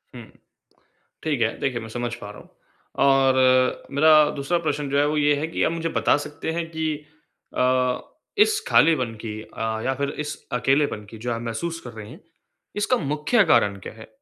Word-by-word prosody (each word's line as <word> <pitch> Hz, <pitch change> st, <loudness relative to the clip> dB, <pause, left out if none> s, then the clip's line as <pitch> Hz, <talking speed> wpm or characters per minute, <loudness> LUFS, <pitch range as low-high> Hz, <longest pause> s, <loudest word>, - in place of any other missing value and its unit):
हुँ। 120 Hz, -, -8 dB, 1.0 s
ठीक 145 Hz, -6 st, -1 dB
है, 115 Hz, -, 0 dB
देखिए 125 Hz, -3 st, -1 dB
मैं 115 Hz, -, -8 dB
समझ 120 Hz, +1 st, -4 dB
पा 105 Hz, -3 st, -9 dB
रहा -, -, -12 dB
हूँ। -, -, -19 dB, 0.6 s
और 130 Hz, -1 st, +3 dB
मेरा 155 Hz, +1 st, +5 dB
दूसरा 145 Hz, +5 st, 0 dB
प्रश्न 145 Hz, -3 st, -2 dB
जो 140 Hz, -, 0 dB
है 145 Hz, -, +3 dB
वो 150 Hz, 0 st, 0 dB
ये 145 Hz, 0 st, +3 dB
है 155 Hz, -, -2 dB
कि -, -, -1 dB
आप -, -, +2 dB
मुझे 165 Hz, 0 st, -2 dB
बता -, -, +2 dB
सकते 150 Hz, +2 st, -5 dB
हैं 170 Hz, 0 st, -2 dB
कि 160 Hz, -1 st, -2 dB, 0.7 s
अ, 125 Hz, 0 st, +2 dB, 0.4 s
इस 425 Hz, 0 st, +4 dB
खालीपन 130 Hz, -8 st, +3 dB
की 110 Hz, -1 st, -5 dB
अ, 110 Hz, 0 st, -4 dB
या 135 Hz, -, +1 dB
फिर 140 Hz, +1 st, -2 dB
इस 150 Hz, 0 st, -3 dB, 0.2 s
अकेलेपन 135 Hz, -3 st, +1 dB
की 115 Hz, -, -10 dB
जो 120 Hz, +2 st, -4 dB
आप 115 Hz, -, -4 dB
महसूस 165 Hz, +9 st, -4 dB
कर 120 Hz, -, -7 dB
रहे 110 Hz, -1 st, -10 dB
हैं, -, -, -12 dB, 0.6 s
इसका 210 Hz, +5 st, +1 dB
मुख्य 150 Hz, -, +1 dB
कारण 105 Hz, -9 st, +3 dB
क्या 95 Hz, -, -9 dB
है? 110 Hz, 0 st, -13 dB
135 Hz, 195 wpm, -23 LUFS, 120-155 Hz, 1.0 s, मेरा